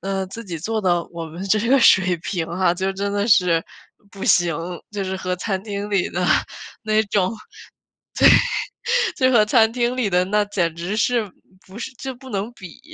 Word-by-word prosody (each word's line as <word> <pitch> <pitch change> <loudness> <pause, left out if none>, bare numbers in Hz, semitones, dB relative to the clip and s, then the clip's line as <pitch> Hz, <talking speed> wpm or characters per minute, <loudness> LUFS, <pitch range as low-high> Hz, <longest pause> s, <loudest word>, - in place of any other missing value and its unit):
嗯， 195 0 -3
自 230 - -7
己 180 -6 -6
做 220 +7 -2
呢， 175 -3 +1
我 165 -1 -6
们 170 +4 -8
这 200 +2 +2
个 275 - +5
水 185 -6 +5
平 170 0 -4
啊， 175 +1 +1
就 190 +2 -2
真 200 +1 -2
的 205 0 0
是 180 -5 +4 0.5
不 195 0 -8
行， 170 -3 +3 0.3
就 205 -2 -4
是 190 0 -3
和 185 -1 -3
餐 190 0 -3
厅 205 -1 -5
里 195 -3 +1
的 180 0 -2 0.6
那 215 -1 +2
种 200 -2 0 1.9
对， 255 - +3
就 260 - +2
和 215 -3 +5
餐 220 0 +4
厅 240 +1 -1
里 250 -5 0
的 180 -1 +2
那 210 +2 +1
简 180 -5 -1
直 175 +5 -4
是， 230 -2 +1 0.4
不 190 +3 -12
是 245 - -6
就 265 -1 -5
不 260 +1 -13
能 205 +1 -3
比。 190 +1 -12
195 Hz, 205 characters per minute, -21 LUFS, 180-220 Hz, 1.9 s, 个